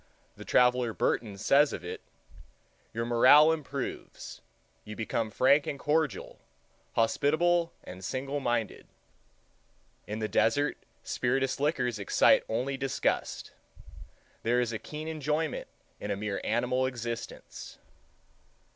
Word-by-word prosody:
The - - -10
traveler 125 -2 +3
Burton 105 -4 -1
says 140 +8 +4
of - - -6
it—"Your 65 - -10
morale 130 +6 +7
improves; 140 -4 -5 0.4
you 105 - -8
become 110 0 -2
frank 140 +6 +3
and 140 - -3
cordial, 150 +1 -1 0.5
hospitable 165 +8 +2
and 90 +1 -10
single 135 +6 -3
minded.... 120 -5 -2 1.2
In 105 - -4
the 110 -1 -2
desert, 145 +8 +1 0.2
spirituous 135 +2 0
liquors 130 -6 0
excite 100 - +4
only 130 +4 -1
disgust. 135 0 -2 0.9
There 120 +2 +2
is 120 -2 -1
a 110 - -3
keen 155 +1 -7
enjoyment 155 0 -2 0.3
in 105 - -6
a 100 - 0
mere 105 -1 -3
animal 125 +2 +1
existence." 120 -2 -7
125 Hz, 110 wpm, -29 LUFS, 115-145 Hz, 1.2 s, morale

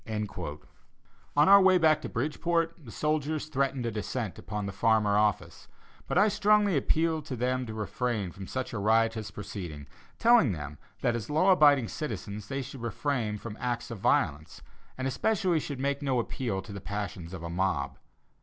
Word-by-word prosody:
On 150 - +6
our 200 +1 +9
way 190 -1 +6
back 160 -3 +4
to - - -5
Bridgeport, 165 +6 0
the - - -10
soldiers 155 +3 -1
threatened 135 -4 -1
a 115 - -1
descent 110 0 -4
upon 105 -1 -4
the 100 - -3
Farmer 105 0 +2
office, 105 -2 0 0.4
but - - -1
I 205 +3 +6
strongly 210 -2 +3
appealed 160 +3 +1
to 130 - -3
them 125 +1 -1
to 110 - -6
refrain 110 -2 -2
from 95 +1 -9
such 130 -2 -4
a 115 - -2
riotous 110 +1 +2
proceeding, 90 -8 -7 0.3
telling 230 - +5
them 75 -2 -7 0.2
that 120 - +1
as 115 -2 -5
law 160 +6 +4
abiding 145 -8 +5
citizens 105 -9 -5
they 135 +2 -3
should 135 0 -9
refrain 120 -2 -2
from 105 0 -7
acts 120 -1 -3
of 115 - -6
violence 75 -3 0 0.3
and 130 0 -2
especially 180 - +1
should 140 -3 -5
make 140 +1 -1
no 135 -3 0
appeal 115 -5 -3
to 100 - -9
the 100 - -7
passions 100 -4 -5
of 90 -3 -7
a 85 - -4
mob. 95 +2 -1
120 Hz, 175 wpm, -29 LUFS, 105-150 Hz, 0.4 s, our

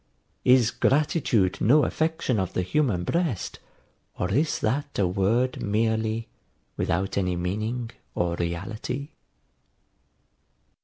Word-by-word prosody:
Is 125 -3 +5
gratitude 125 - +2
no 145 +8 +5
affection 160 -7 0
of 95 -1 -2
the 90 - 0
human 115 -5 +1
breast, 160 - -1 0.6
or 90 - -1
is 150 +9 +2
that 140 +6 -1
a 100 - +3
word 105 +8 +1
merely, 110 +1 0 0.5
without 95 +3 0
any 90 -2 0
meaning 110 +7 -2 0.2
or 85 -1 0
reality? 100 - -4
110 Hz, 105 wpm, -26 LUFS, 95-130 Hz, 0.6 s, Is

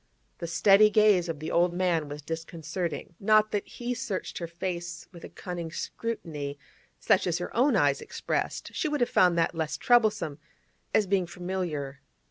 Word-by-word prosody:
The 170 - -4
steady 195 +5 +6
gaze 210 -5 +4
of 165 - -3
the 155 +1 -5
old 175 0 +2
man 175 -5 +1
was 145 0 -7
disconcerting. 165 +2 -4
Not 215 +1 +4
that 205 -1 -2
he 245 0 -4
searched 200 -5 -4
her 170 - -4
face 175 0 -5
with 170 -3 -13
a - - -8
cunning 175 -2 -6
scrutiny, 155 -10 -4 0.4
such - - +3
as 170 -1 +1
her 175 - -6
own 255 +2 +4
eyes 145 -7 +3
expressed; - - -3
she 350 - -1
would 295 -3 -1
have 240 - +1
found 180 -2 +4
that 165 - +2
less 160 -2 -2
troublesome, 215 - +2 0.5
as 215 - +3
being 190 -2 +1
familiar. 175 -6 -4
175 Hz, 170 wpm, -28 LUFS, 165-205 Hz, 0.5 s, steady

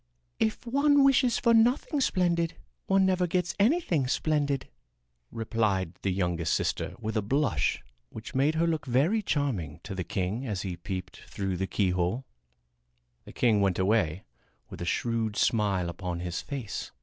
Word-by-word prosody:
"If 220 +2 0
one 280 +3 +4
wishes 255 -3 +4
for 235 -1 +3
nothing 245 +6 +3
splendid 170 -7 +1 0.3
one 195 0 +4
never 185 -1 +2
gets 180 +1 0
anything 200 - +2
splendid," 145 0 0 0.6
replied 110 -6 -1
the 95 - 0
youngest 90 -3 0
sister - - -2
with 110 +1 -4
a 110 - +2
blush 135 +4 0 0.3
which 110 0 -9
made 140 +4 +2
her 165 +1 +2
look 160 -4 -1
very 150 - +2
charming 125 - -2
to 105 - -6
the 95 -1 -3
king 95 - -2
as 100 -4 -3
he 95 -3 -3
peeped 90 +2 -6
through 95 -2 -3
the 95 +2 -2
keyhole. 95 +6 0 1.0
The - - -11
king 110 -4 +3
went 95 -3 +2
away 95 -3 +1 0.5
with - - -8
a - - -2
shrewd 115 +2 -1
smile 100 -5 +1
upon 85 0 -4
his 90 -1 -3
face. 130 -8 -5
115 Hz, 155 wpm, -28 LUFS, -, 1.0 s, one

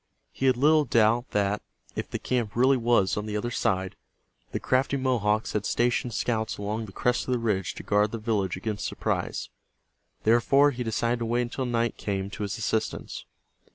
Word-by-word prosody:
He 135 - -1
had 130 -2 +4
little 150 +3 +5
doubt 115 -1 +2
that, 100 0 0 0.3
if - - -4
the - - -3
camp 120 -5 -2
really 130 +3 +5
was 115 -6 +2
on 105 +1 -3
the 105 0 -2
other 120 +3 -3
side, 95 -4 0 0.6
the - - -2
crafty 130 +2 +1
Mohawks 110 -5 +1
had 105 - 0
stationed 120 0 0
scouts 110 -2 -1
along 105 +2 -3
the - - -10
crest 125 +5 0
of 130 - +1
the - - +2
ridge 95 -8 -1
to - - -8
guard 105 +1 +2
the 115 - -3
village 105 -5 -1
against 105 +1 -3
surprise. - - -2 0.7
Therefore, 135 +6 +4
he 125 -2 -4
decided 115 +1 0
to 115 - -2
wait 120 +2 +1
until 125 +2 -3
night 115 -1 0
came 100 -1 -3
to 105 - -7
his 105 +2 -2
assistance. 110 -1 -2
115 Hz, 190 wpm, -27 LUFS, 105-125 Hz, 0.7 s, little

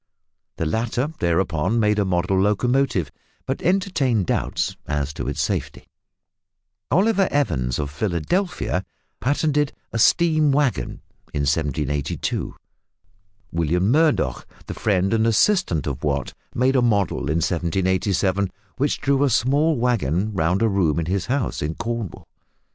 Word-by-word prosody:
The 80 - -2
latter 120 - -1
thereupon 85 +4 +1
made 105 -1 +2
a 100 - +2
model 95 +1 +1
locomotive, 105 - +1 0.3
but 135 +1 -3
entertained 155 - +1
doubts - - -1
as 75 -1 -2
to - - -5
its - - -3
safety. - - -3 1.0
Oliver 200 +1 +3
Evans, 70 - 0
of 70 -1 -3
Philadelphia, 95 - -1 0.4
patented 145 +2 +1 0.2
a 115 - -1
"steam 155 +3 +4
waggon" 135 - 0 0.3
in 75 - 0
1782. 75 -1 -1 1.0
William 85 +5 +1
Murdoch, 150 - +2 0.2
the - - -6
friend 95 -1 +1
and 110 0 +2
assistant 115 - +2
of 70 -1 -4
Watt, 70 -2 -1 0.2
made 130 +2 +2
a 130 - +4
model 105 -5 +1
in 80 - +1
1787 95 +3 0 0.3
which 145 +3 0
drew 140 0 +2
a 140 - +3
small 145 +6 +2
waggon 110 - 0
round 90 +3 +1
a - - +4
room 90 -7 +1
in 80 - -2
his 95 +2 -1
house 130 0 -1
in 75 +2 -2
Cornwall. 115 -6 -5
100 Hz, 130 wpm, -22 LUFS, 85-135 Hz, 1.0 s, steam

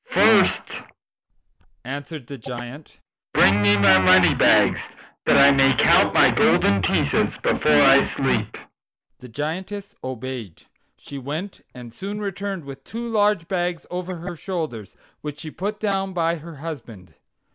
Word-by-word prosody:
"First," - - +4 1.2
answered 140 +1 -7
the 140 +1 -10
Giant, 125 +5 -9 0.4
"bring 100 +3 +4
me 105 0 +4
my 100 -2 +5
money 95 - +5
bags, - - +3 0.5
that - - +5
I 140 0 +7
may 135 -1 +3
count - - +4
my - - +4
golden 100 -1 +2
pieces 85 - 0
before 75 -1 +3
I - - +5
sleep." - - -1 0.6
The 125 - -13
Giantess 185 - -6
obeyed. 130 -7 -7 0.3
She 140 - -10
went 155 +9 -7
and 120 -2 -11
soon 200 - -6
returned 200 -4 -5
with 135 -1 -11
two 235 +7 -7
large 205 -6 0
bags 175 -3 -3
over 180 +1 -5
her 175 +1 -8
shoulders, 150 - -6 0.2
which 150 -1 -7
she 155 0 -8
put 205 +5 -5
down 195 -2 -2
by 170 -1 -1
her 165 +1 -11
husband. 125 - -10
150 Hz, 140 wpm, -22 LUFS, 125-185 Hz, 1.2 s, I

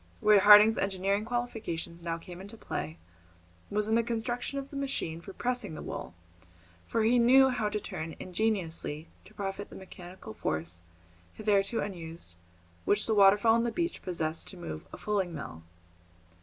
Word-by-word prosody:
Where 210 -1 +6
Harding's 210 +2 +8
engineering 195 +2 0
qualifications 225 -8 -4
now 165 -1 -2
came 175 +2 -10
into 205 +4 -10
play 80 - -5 0.7
was 210 +1 0
in 220 - +1
the 230 - +5
construction 240 +3 -3
of 275 0 -5
the - - -9
machine 265 -12 -2
for 195 - -9
pressing 245 -5 -2
the - - -7
wool, - - -6 0.7
for 225 - +1
he 240 +3 +4
knew 265 +3 +7
how 235 -4 0
to 210 - -2
turn 160 -5 -6
ingeniously 175 -6 -2 0.2
to - - -17
profit 200 0 -4
the - - -11
mechanical 185 - -10
force, 85 -1 -3 0.5
hitherto 205 +1 +1
unused, 165 - -6 0.5
which 205 +1 +3
the 220 - +2
waterfall 205 +2 +6
on 230 0 +3
the 235 - 0
beach 340 +8 -2
possessed 165 -3 -2
to 190 - -6
move 80 - -7
a - - -8
fulling 195 -5 -1
mill. 80 - -7
200 Hz, 165 wpm, -30 LUFS, 170-225 Hz, 0.7 s, Harding's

